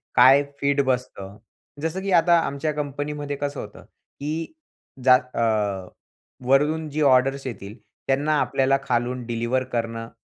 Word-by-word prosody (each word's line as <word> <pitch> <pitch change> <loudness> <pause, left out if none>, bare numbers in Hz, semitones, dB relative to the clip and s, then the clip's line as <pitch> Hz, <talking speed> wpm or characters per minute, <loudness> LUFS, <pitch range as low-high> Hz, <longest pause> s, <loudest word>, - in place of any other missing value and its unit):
काय 135 +3 +7 0.2
फीट 140 0 +2
बसतं 105 -6 -3 0.4
जसं, 165 +4 -2
की 195 0 -3
अ, 175 - +6
आता 170 0 +4
आमच्या 150 0 -2
कंपनीमध्ये 145 0 -4
कसं 145 0 -4
होतं, 105 - -10
की 155 - -7 0.5
जा 130 -1 +8
अ, 110 -7 -1 0.6
वरून 150 +3 +2
जी 155 +2 -3
ऑर्डर्स 135 0 +3
येतील 105 -1 -8 0.3
त्यांना 145 +3 +1
आपल्याला 135 +1 +2
खालून 125 -1 -1
डिलिव्हर 120 +2 -1
करणं 115 -1 -3
135 Hz, 135 wpm, -23 LUFS, 120-145 Hz, 0.6 s, जा